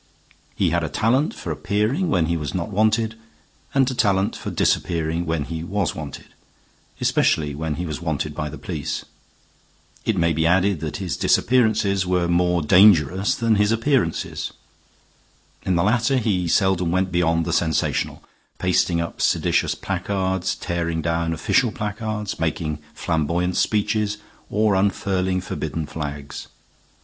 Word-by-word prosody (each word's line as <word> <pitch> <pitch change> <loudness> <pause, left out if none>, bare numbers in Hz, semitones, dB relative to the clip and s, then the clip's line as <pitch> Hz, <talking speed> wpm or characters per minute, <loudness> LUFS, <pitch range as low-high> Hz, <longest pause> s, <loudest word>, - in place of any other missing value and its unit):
He 90 -4 +1
had 85 0 +1
a 80 - -2
talent 120 - +1
for - - -5
appearing 110 - 0
when 90 - +2
he 85 +1 0
was 75 -2 -4
not 90 +3 -3
wanted 110 +2 +2 0.6
and 135 -1 +2
a - - -3
talent 100 -4 +1
for - - -5
disappearing 85 0 0
when 80 -2 0
he 80 +2 -5
was 95 0 -1
wanted, 75 -2 -8 0.7
especially 75 -2 +2
when 75 +1 -3
he 90 - -4
was 80 -1 -5
wanted 75 -2 -2
by 75 +1 -3
the - - -8
police. - - -4 1.0
It 110 - 0
may 85 -1 +2
be 80 +1 +1
added 95 +1 +3
that 75 -1 -4
his 95 -3 -3
disappearances 110 -6 +2
were 90 -1 +1
more 90 -1 +2
dangerous 95 +1 +5
than 115 -2 +2
his 105 +1 +3
appearances. 115 - 0 1.2
In 95 - +2
the 85 - +2
latter 115 +5 +2
he 100 -7 0
seldom 95 -1 +2
went 95 +2 0
beyond 85 -1 +1
the 85 - -2
sensational 80 -3 0 0.3
pasting 90 -1 +1
up 85 0 -4
seditious - - +2
placards, 95 -2 -2
tearing 85 -2 -2
down 85 0 0
official 110 +8 +1
placards, 105 -2 -4
making 80 -1 -2 0.2
flamboyant 85 +2 0
speeches, 105 0 +1 0.3
or 105 0 +2
unfurling 95 -1 0
forbidden 80 -3 -4
flags. 70 -2 -6
90 Hz, 145 wpm, -22 LUFS, 80-105 Hz, 1.2 s, dangerous